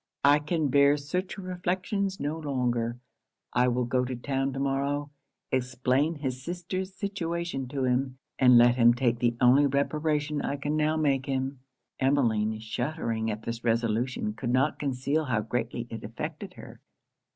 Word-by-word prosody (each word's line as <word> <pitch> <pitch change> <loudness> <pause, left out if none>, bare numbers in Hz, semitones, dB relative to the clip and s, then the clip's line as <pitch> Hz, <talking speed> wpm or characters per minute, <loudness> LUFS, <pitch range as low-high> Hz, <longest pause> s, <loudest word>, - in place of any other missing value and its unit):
I 145 +1 +6
can 150 0 -1
bear 140 +1 +5
such 180 +7 -3
reflections 190 +1 -2
no 150 +3 -2
longer 120 -5 -1 0.6
I 125 0 +3
will 125 0 +1
go 125 +1 +1
to 125 0 -3
town 135 +2 -1
to 135 - -4
morrow, 140 +1 -1 0.4
explain 130 +4 +1
his 130 -4 -4
sister's 185 +4 -4
situation 170 -8 -3
to 135 +1 -3
him, 130 +1 0 0.2
and 125 -2 +7
let 120 +1 +6
him 120 -1 +6
take 120 -2 +1
the 120 -1 +1
only 130 +4 +6
reparation 150 +1 0
I 140 - -2
can 145 +2 -2
now 155 +1 +1
make 140 -4 +1
him.' 135 0 -2 0.4
Emmeline, 115 -6 +2
shuddering 115 -1 -2
at 110 +1 -4
this 115 +1 -5
resolution, 115 -1 0
could 120 +2 -4
not 130 +4 +2
conceal 140 +3 -1
how 120 -6 0
greatly 120 +2 -3
it 115 - -6
affected 155 - -6
her. - - -12
135 Hz, 155 wpm, -28 LUFS, 125-150 Hz, 0.6 s, and